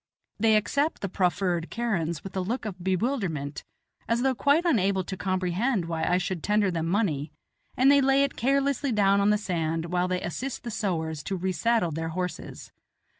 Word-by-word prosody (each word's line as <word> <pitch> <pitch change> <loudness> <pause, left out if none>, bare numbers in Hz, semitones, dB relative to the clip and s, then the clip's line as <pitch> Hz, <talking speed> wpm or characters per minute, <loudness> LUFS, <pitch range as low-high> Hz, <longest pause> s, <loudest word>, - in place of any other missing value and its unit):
They 220 0 +4
accept 280 +9 0
the 195 - -2
proffered 180 -2 0
kerans 175 -9 -2
with 195 - -8
a - - 0
look 220 +6 -3
of 185 -4 -6
bewilderment, 185 - -1 0.5
as 235 +2 +1
though 265 -1 +3
quite 285 +7 +2
unable 195 - +2
to 190 - -5
comprehend 185 +3 0
why 165 -1 -3
I 180 - +2
should 180 -2 -2
tender 210 0 +2
them 165 -1 -2
money, 165 -7 0 0.5
and 265 +2 +6
they 280 0 +6
lay 270 +1 +4
it 280 - -1
carelessly 275 +2 +1
down 200 -2 +3
on 200 - +3
the 210 - +4
sand 165 -5 -2
while 180 0 +2
they 185 0 -1
assist 245 - -4
the 235 - -5
sowars 160 -8 -2
to 195 - -2
resaddle 185 +2 +1
their 165 +1 -3
horses. 180 +2 -5
195 Hz, 180 wpm, -27 LUFS, 175-235 Hz, 0.5 s, and